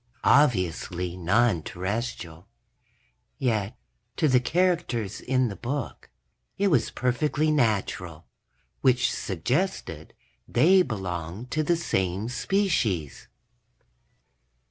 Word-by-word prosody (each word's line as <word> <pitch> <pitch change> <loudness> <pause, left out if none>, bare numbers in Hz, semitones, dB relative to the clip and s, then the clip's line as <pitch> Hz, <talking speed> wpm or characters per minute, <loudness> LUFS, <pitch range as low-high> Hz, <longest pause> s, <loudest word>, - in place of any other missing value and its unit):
Obviously 90 - +2
non 95 +1 +2
Terrestrial. 95 -2 -5 0.9
Yet, 110 -2 -1 0.4
to 155 - +3
the 130 -3 +5
characters 155 - 0
in 130 -1 +1
the 100 - -5
book, 130 +4 -5 0.5
it 200 0 +2
was 145 -9 +2
perfectly 150 +5 0
natural 100 - -1 0.6
which 130 -1 +3
suggested 100 - -2 0.3
they 185 +4 +5
belonged 95 - -4
to 155 - +1
the 170 +3 +1
same 95 - -1
species. 125 - -1
120 Hz, 90 wpm, -26 LUFS, 90-145 Hz, 0.9 s, the